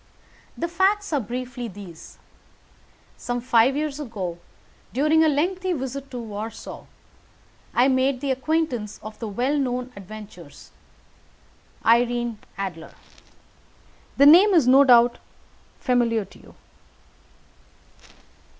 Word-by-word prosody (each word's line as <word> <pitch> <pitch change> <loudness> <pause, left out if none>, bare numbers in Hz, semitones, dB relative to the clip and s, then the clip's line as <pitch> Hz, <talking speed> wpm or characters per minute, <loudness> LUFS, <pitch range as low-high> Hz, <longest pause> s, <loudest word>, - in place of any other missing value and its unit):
"The 340 - -2
facts 380 +2 +1
are 290 - +2
briefly 250 +1 -5
these: 190 -5 -12 1.0
Some 245 0 -3
five 245 +1 +3
years 300 -1 -3
ago, 195 - -5 0.5
during 305 +5 +3
a 315 - +4
lengthy 365 +5 0
visit 275 -1 -5
to 250 - -7
Warsaw, 225 -1 -7 0.9
I 245 +2 +4
made 260 0 +1
the 275 0 -2
acquaintance 265 -6 -2
of 215 0 -9
the 230 - -4
well 250 +8 -1
known 250 -1 -3
adventuress 200 -5 -12 1.1
Irene 240 -1 +2 0.2
Adler. 185 -5 -6 1.2
The 280 - +6
name 365 +7 +7
is 305 -7 +4
no 270 +2 +7
doubt 240 -2 +5 0.6
familiar 235 -4 +1
to - - -18
you." - - -18
250 Hz, 110 wpm, -23 LUFS, 225-285 Hz, 1.2 s, name